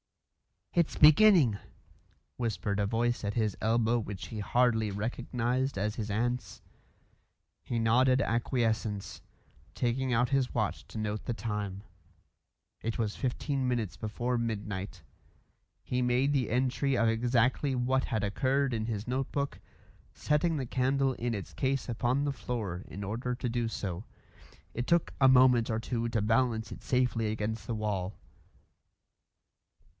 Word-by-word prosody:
"It's 170 -2 +1
beginning," 155 - +6 0.8
whispered 105 -4 -1
a 100 - +1
voice 120 +2 0
at 100 - -1
his 110 -4 0
elbow 115 +1 +2
which 100 -4 -6
he 110 - -6
hardly 110 0 +2
recognised 120 +4 -2
as 105 +2 -1
his 110 -2 -4
aunt's. 115 -1 -2 1.0
He 120 - -3
nodded 125 +3 +4
acquiescence, 115 -4 -1 0.5
taking 125 +2 0
out 120 +1 +2
his 135 -2 0
watch - - -1
to - - -9
note 105 -1 -3
the 120 - -1
time. 105 -4 -4 1.0
It 115 0 -2
was 110 -3 -2
fifteen 135 +1 -1
minutes 120 -6 -1
before 120 +3 -2
midnight; 105 -5 -4 0.8
he 125 0 -1
made 125 +3 +2
the 135 -5 +1
entry 130 +2 +1
of 115 - +3
exactly 125 +4 +1
what 130 +2 +1
had 110 -4 -1
occurred 130 +6 +1
in 110 -1 -1
his 110 -1 -4
notebook, 135 +2 -2 0.6
setting 150 +3 +1
the 135 -3 -2
candle 130 +2 +1
in 120 -1 -2
its 100 - -7
case 135 -2 -1
upon 120 +4 0
the 145 -1 0
floor 105 -9 -4
in 100 - -7
order 120 +5 -3
to 125 0 -3
do 120 0 -1
so. 100 -2 -4 0.7
It 120 +2 -3
took 170 -1 +2
a 135 - +6
moment 125 -3 +5
or 110 -1 0
two 115 0 -2
to 115 -2 0
balance 115 +1 +1
it - - -8
safely 125 -4 +1
against 110 +1 -3
the 115 - -2
wall. 105 -3 -2
120 Hz, 140 wpm, -30 LUFS, 110-130 Hz, 1.0 s, beginning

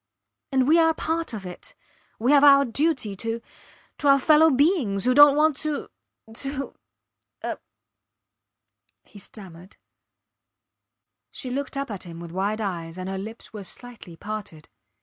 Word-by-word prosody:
And 260 -1 +2
we 325 +3 +5
are 325 -1 +3
part 325 -1 -2
of 210 -4 -7
it. 180 - -10 0.4
We 240 +5 +1
have 285 -1 +6
our 280 -1 +7
duty 260 -3 0
to 225 +2 -3 0.6
to 290 - -1
our 275 0 +7
fellow 310 +3 +5
beings 265 - +2
who 255 - +3
dont 290 +1 +8
want 310 -1 +3
to... 305 -2 -3 0.5
to... 275 -1 -4 0.7
er. - - -4 1.4
He 205 - -15
stammered. 185 -2 -12 1.5
She 255 - -7
looked 275 +1 -4
up 275 -3 -3
at 200 - -6
him 170 -1 -9
with 170 -1 -9
wide 200 +4 -2
eyes, 170 -4 -4
and 185 0 -5
her 190 0 -4
lips 220 +4 -9
were 210 -2 -7
slightly 220 -4 -8
parted. 205 -7 -7
245 Hz, 150 wpm, -24 LUFS, 195-285 Hz, 1.5 s, dont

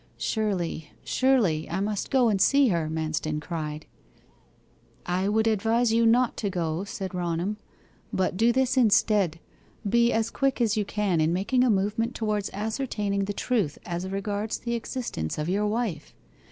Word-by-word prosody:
'Surely, 180 -8 -2
surely, 225 -13 +2
I 170 - -2
must 205 0 -2
go 260 -3 +4
and 200 -4 +1
see 275 +3 +5
her!' 165 -4 0
Manston 155 -1 -2
cried. 155 -2 -5 1.2
'I 185 +3 0
would 220 +1 +2
advise 225 +2 +2
you 230 0 +4
not 240 +2 +3
to 205 - -1
go,' 170 -1 -2
said 190 -2 -5
Raunham. 175 +3 -2 0.5
'But 185 -1 0
do 230 +5 +4
this 260 +1 +1
instead 210 -7 +3 0.5
be 235 +3 +3
as 225 0 0
quick 275 -1 0
as 225 -2 +2
you 210 -2 0
can 200 -6 0
in 155 +1 +2
making 205 +8 +1
a 255 - +3
movement 215 +4 0
towards 210 -3 -1
ascertaining 210 -2 -2
the 205 - -3
truth 205 - -1
as 175 +2 -4
regards 205 +2 -2
the 235 0 -4
existence 230 - -3
of 155 +2 -2
your 205 +3 +1
wife. 210 -8 -3
205 Hz, 160 wpm, -26 LUFS, 175-230 Hz, 1.2 s, see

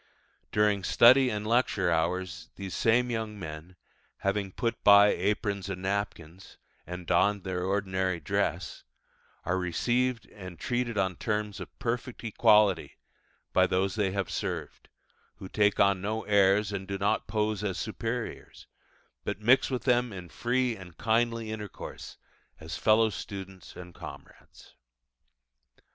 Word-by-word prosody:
During 105 -2 +2
study 130 +7 +6
and 105 -2 -3
lecture 110 -6 +2
hours 85 0 -1
these 95 -1 -6
same 120 +2 +2
young 110 -2 -3
men, 80 0 -8 0.5
having 100 0 -1
put 115 +4 -3
by 100 0 +8
aprons 100 0 -1
and 95 -1 -5
napkins, 95 -3 -4 0.3
and 90 +1 -7
donned 100 +3 +2
their 90 -1 -3
ordinary 95 -2 -1
dress, 75 - -2 0.6
are 90 +2 0
received 120 +7 0
and 95 -4 -10
treated 120 -2 -2
on 95 -2 0
terms 105 -2 -2
of - - -10
perfect 125 -1 -3
equality 105 -4 +3 0.6
by - - +4
those 95 +1 0
they 105 -3 0
have 100 0 -3
served, 90 -7 -5 0.5
who 95 - -9
take 105 +1 +2
on 100 -2 +4
no 110 +3 -2
airs, 100 0 +3
and 95 -1 -5
do 100 - -3
not 100 +1 0
pose 105 0 -1
as 95 -3 -2
superiors, 115 +2 -5 0.6
but - - -3
mix 120 +5 +4
with 130 -2 -2
them 125 -2 +2
in 90 -3 -8
free 125 +3 0
and 90 -5 -12
kindly 115 0 0
intercourse 105 -2 -8 0.4
as 80 +1 -6
fellow 110 0 +3
students 95 -1 -8
and 90 -1 -10
comrades. - - -12
100 Hz, 135 wpm, -29 LUFS, 95-110 Hz, 0.6 s, by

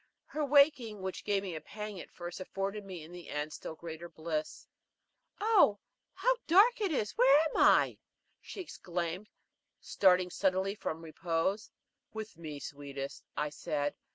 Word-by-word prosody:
Her 305 - -3
waking, 280 -8 +4
which 190 -1 -4
gave 200 -1 +1
me 185 -3 -4
a 155 - -5
pang 210 -2 -7
at - - -9
first, 175 +1 -7
afforded 195 +2 -3
me 185 -5 -8
in 160 - -12
the 175 -3 -10
end 150 +1 -2
a - - -11
still 160 - -7
greater 165 +1 -8
bliss. 155 -1 -4 0.7
"Oh, 410 - +5 0.4
how - - +2
dark 425 +8 +6
it 395 -4 +1
is 215 -8 0
where 270 +4 +7
am - - -4
I?" - - +5 0.4
she 390 - -7
exclaimed, 180 - -4 0.5
starting 180 -2 +3
suddenly 190 +1 +1
from 165 -5 -5
repose. 170 +5 -1 0.4
"With 220 0 -6
me, 155 -3 -7
sweetest," 140 -1 -7
I 150 0 0
said. 145 -1 -2
185 Hz, 155 wpm, -32 LUFS, 160-215 Hz, 0.7 s, where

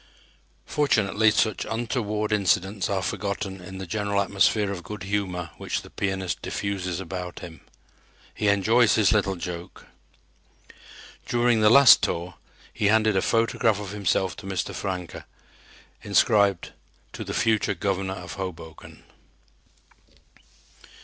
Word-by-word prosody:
Fortunately 110 -7 +2
such 110 0 +1
untoward 110 -2 -2
incidents 95 -1 +1
are 95 -2 -1
forgotten 95 -2 -4
in 95 +1 -9
the 95 - -6
general 100 +1 -1
atmosphere 100 +1 +2
of 95 -3 -5
good 100 +2 -8
humor 95 -4 -3
which - - -3
the - - -14
pianist 95 -2 -3
diffuses 95 -3 -3
about 90 -1 -6
him. 80 -4 -10 0.7
He 105 - -2
enjoys 110 +4 +4
his 110 -3 +3
little 100 -3 +1
joke. 85 0 -7 1.4
During 120 -2 +2
the 105 - +6
last 140 +2 +8
tour 85 +1 -2 0.4
he 105 - 0
handed 110 0 +3
a 95 - +2
photograph 115 -1 +1
of 100 -2 -6
himself 95 -3 0
to 95 - -9
Mr. 95 -2 -3
Francke 90 -3 -5 0.8
inscribed: 100 -4 +2 0.4
"To - - -6
the - - -5
future 110 -2 +1
Governor 95 -1 -2
of - - -8
Hoboken." 80 -4 -8
100 Hz, 125 wpm, -25 LUFS, 95-105 Hz, 1.4 s, last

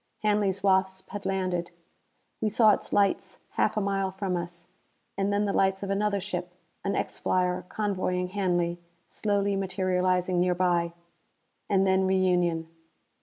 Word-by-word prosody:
Hanley's 205 -2 +1
Wasp 190 -1 +1
had 205 -2 -5
landed: 185 -3 -1 0.7
we 215 - +2
saw 215 0 +5
its - - -2
lights 200 -1 +1
half - - +1
a - - +2
mile 195 -1 0
from 190 -1 -3
us. 175 0 -6 0.5
And 200 +1 0
then 205 +1 +1
the 200 - 0
lights 190 0 +2
of 195 - -2
another 200 0 +1
ship 180 -2 -5 0.3
an 200 0 -1
X - - -3
flyer 180 -1 0
convoying 185 -3 -1
Hanley 175 -3 0 0.3
slowly 200 -1 0
materializing 185 -1 +1
nearby. 175 -1 +2 0.8
And 195 -1 +3
then 190 0 +3
reunion. 180 -3 +2
190 Hz, 140 wpm, -27 LUFS, 180-200 Hz, 0.8 s, saw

